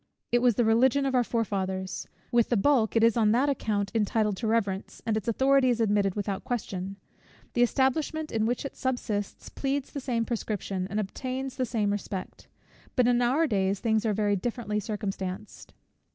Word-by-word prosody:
It 240 Hz, -, +4 dB
was 245 Hz, -3 st, +4 dB
the 240 Hz, -, +2 dB
Religion 260 Hz, +5 st, +4 dB
of 270 Hz, -, 0 dB
our 250 Hz, -1 st, +4 dB
forefathers: 190 Hz, -5 st, -2 dB, 0.2 s
with 240 Hz, -2 st, +3 dB
the 240 Hz, -, +2 dB
bulk 235 Hz, 0 st, +3 dB
it 225 Hz, -, +4 dB
is 230 Hz, -1 st, +5 dB
on 220 Hz, -2 st, +3 dB
that 265 Hz, +5 st, +3 dB
account 210 Hz, -7 st, -1 dB
entitled 215 Hz, -1 st, +1 dB
to 225 Hz, -, -2 dB
reverence, 205 Hz, -3 st, -1 dB
and 225 Hz, -, +1 dB
its 215 Hz, -1 st, -3 dB
authority 265 Hz, +3 st, +4 dB
is 240 Hz, -2 st, +1 dB
admitted 205 Hz, -3 st, +2 dB
without 200 Hz, -2 st, -3 dB
question. 195 Hz, -5 st, -3 dB, 0.6 s
The 240 Hz, -, +1 dB
establishment 285 Hz, +5 st, +1 dB
in 220 Hz, -1 st, +1 dB
which 245 Hz, +3 st, -1 dB
it 275 Hz, -, -6 dB
subsists 225 Hz, -6 st, -3 dB
pleads 275 Hz, 0 st, -2 dB
the 285 Hz, -, -4 dB
same 240 Hz, -4 st, -1 dB
prescription, 200 Hz, -5 st, -3 dB
and 205 Hz, +2 st, -1 dB
obtains 255 Hz, +6 st, -4 dB
the 255 Hz, -, -1 dB
same 215 Hz, -3 st, 0 dB
respect. 200 Hz, -2 st, -5 dB, 0.5 s
But 250 Hz, -2 st, +4 dB
in 245 Hz, 0 st, +3 dB
our 265 Hz, +7 st, +3 dB
days, 195 Hz, -6 st, 0 dB
things 220 Hz, -2 st, +1 dB
are 220 Hz, -, +1 dB
very 205 Hz, -1 st, +2 dB
differently 210 Hz, +1 st, -2 dB
circumstanced. 200 Hz, -2 st, -5 dB
225 Hz, 180 wpm, -28 LUFS, 205-250 Hz, 0.6 s, is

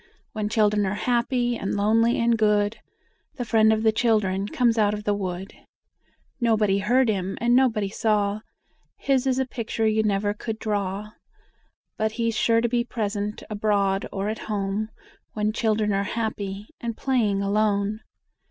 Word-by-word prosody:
When 215 Hz, -1 st, -2 dB
children 210 Hz, -1 st, +2 dB
are 195 Hz, -, -1 dB
happy 240 Hz, +2 st, 0 dB
and 195 Hz, -3 st, -3 dB
lonely 225 Hz, +3 st, +3 dB
and 235 Hz, 0 st, +3 dB
good, 210 Hz, 0 st, +1 dB, 0.6 s
The 245 Hz, -, -4 dB
Friend 220 Hz, -1 st, +4 dB
of 220 Hz, 0 st, +1 dB
the 220 Hz, -, +5 dB
Children 210 Hz, -4 st, +1 dB
comes 235 Hz, 0 st, +1 dB
out 210 Hz, -1 st, +3 dB
of 210 Hz, -, -7 dB
the 205 Hz, -, +1 dB
wood. 190 Hz, -1 st, -4 dB, 0.9 s
Nobody 215 Hz, -5 st, +2 dB
heard 245 Hz, +5 st, +3 dB
him 195 Hz, -3 st, -1 dB
and 240 Hz, +1 st, +3 dB
nobody 230 Hz, -6 st, +2 dB
saw, 210 Hz, -1 st, 0 dB, 0.6 s
His 270 Hz, -1 st, +1 dB
is 260 Hz, -1 st, +1 dB
a 265 Hz, -, +1 dB
picture 230 Hz, -2 st, -3 dB
you 220 Hz, 0 st, +3 dB
never 205 Hz, -1 st, 0 dB
could 220 Hz, +1 st, -5 dB
draw, 205 Hz, -1 st, -2 dB, 0.9 s
But 220 Hz, 0 st, 0 dB
he's 230 Hz, -1 st, -1 dB
sure 230 Hz, +1 st, +3 dB
to 235 Hz, -, +1 dB
be 240 Hz, 0 st, +1 dB
present, 210 Hz, -3 st, -3 dB
abroad 200 Hz, -2 st, 0 dB
or 195 Hz, +1 st, -3 dB
at 215 Hz, +1 st, -3 dB
home, 205 Hz, +1 st, -2 dB, 0.4 s
When 215 Hz, 0 st, -1 dB
children 215 Hz, -2 st, +1 dB
are 195 Hz, -, +1 dB
happy, 205 Hz, -2 st, -3 dB
and 230 Hz, -2 st, -4 dB
playing 215 Hz, -7 st, +1 dB
alone. 205 Hz, 0 st, +1 dB
215 Hz, 160 wpm, -24 LUFS, 205-230 Hz, 0.9 s, the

